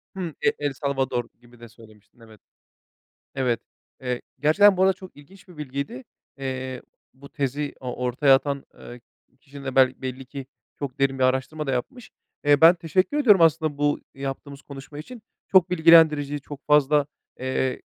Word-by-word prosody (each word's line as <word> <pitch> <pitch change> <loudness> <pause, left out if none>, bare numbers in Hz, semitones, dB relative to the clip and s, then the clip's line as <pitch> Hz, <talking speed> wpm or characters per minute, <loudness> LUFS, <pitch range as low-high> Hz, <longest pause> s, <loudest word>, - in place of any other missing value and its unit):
Hımm, 175 -5 -5
E - - +6
El 145 -1 -2
Salvador 135 -3 -2 0.2
gibi 120 0 -20
de 120 -1 -12
söylemiştin. 110 -1 -20
Evet, 110 -2 -17 0.9
evet, 125 -4 0 0.4
eee, 125 -1 -3 0.2
gerçekten 190 +7 +5
bu 185 - +1
arada 190 0 +5
çok 185 0 -14
ilginç 185 +7 -17
bir 180 - -15
bilgiydi. 140 -2 -6 0.3
Eee, 130 -1 -5 0.3
bu 140 +1 -14
tezi 145 +1 -3
o 125 -1 -6
ortaya 135 +3 +4
atan, 140 0 -1
eee, 120 0 -11 0.4
kişi 140 -2 -12
de 135 -1 -4
bel 130 -1 +5
belli 130 0 -5
ki 135 0 -8 0.3
çok 140 -3 -6
derin 135 -1 +1
bir 130 - +2
araştırma 130 +4 -1
da 135 - -1
yapmış. 240 - -5 0.3
Eee, 145 -1 +4
ben 165 +2 +8
teşekkür 180 - -1
ediyorum 215 -10 +5
aslında 160 -2 +2
bu 145 0 +1
yaptığımız 140 +1 -7
konuşma 140 +1 -11
için. 225 +9 -10 0.2
Çok 185 -2 +4
bilgilendirici, 160 -4 +5
çok 145 0 -11
fazla, 150 -1 +3 0.3
eee, 130 0 -2
140 Hz, 165 wpm, -24 LUFS, 130-155 Hz, 0.9 s, ben